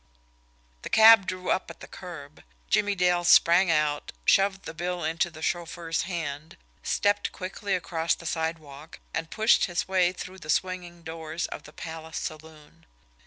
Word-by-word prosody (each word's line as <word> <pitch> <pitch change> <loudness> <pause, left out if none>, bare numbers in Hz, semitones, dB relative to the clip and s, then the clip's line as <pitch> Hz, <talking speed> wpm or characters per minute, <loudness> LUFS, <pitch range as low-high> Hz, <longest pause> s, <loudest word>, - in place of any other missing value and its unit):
The - - -7
cab 220 -3 +8
drew 185 0 -3
up 190 - -1
at - - -11
the - - -10
curb. 155 -6 -10 0.2
Jimmie 205 - +2
Dale 180 -1 +2
sprang 175 +1 +6
out, 150 -2 0
shoved 195 0 +3
the - - -7
bill 175 +1 -3
into 165 +2 0
the 160 -1 -11
chauffeur's 170 -1 -2
hand, 160 -3 -5 0.2
stepped 205 0 0
quickly 195 +1 -3
across 170 -2 -1
the 170 - -14
sidewalk, 160 -2 -4 0.2
and 165 0 -3
pushed 220 +1 +3
his 175 -3 -2
way 185 -2 +3
through 185 +1 -9
the 155 - -12
swinging 175 0 -2
doors 160 0 -5
of - - -8
the 150 - -13
Palace 160 0 -7
Saloon. 155 -1 -9
170 Hz, 160 wpm, -27 LUFS, 160-185 Hz, 0.2 s, cab